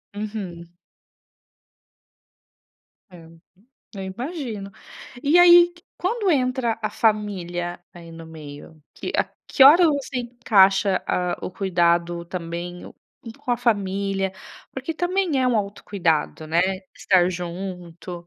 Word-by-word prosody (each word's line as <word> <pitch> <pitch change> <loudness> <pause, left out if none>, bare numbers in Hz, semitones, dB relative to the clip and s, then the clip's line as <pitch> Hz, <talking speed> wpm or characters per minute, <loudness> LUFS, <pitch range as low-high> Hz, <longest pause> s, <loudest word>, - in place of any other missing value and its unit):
Uhum. 200 -5 -6 2.4
É. 175 -3 -14 0.7
Eu 195 - -6
imagino. 230 - -6 0.5
E 300 +5 +4
aí, 350 0 +8 0.3
quando 405 +1 0
entra 255 -5 0
a 215 - 0
família, 180 -5 -1
aí, 170 -1 -12
no 165 0 -11
meio? 155 0 -12
Que - - -6
a - - +3 0.2
que - - +3
hora 310 +7 +9
você 280 -3 -1
encaixa, 200 -5 +3
ah, 180 -1 -1
o - - -4
cuidado 170 -2 0
também, 175 0 -6
um - - -12 0.5
com 280 -3 -6
a - - +1
família, 195 -4 -1 0.4
porque 270 +5 -5
também 355 -3 0
é 255 - +2
um 250 - +2
autocuidado, 195 -6 -1
né, 160 +2 0 0.4
estar 180 -2 +3
junto 175 -1 -7
195 Hz, 115 wpm, -23 LUFS, 175-250 Hz, 2.4 s, hora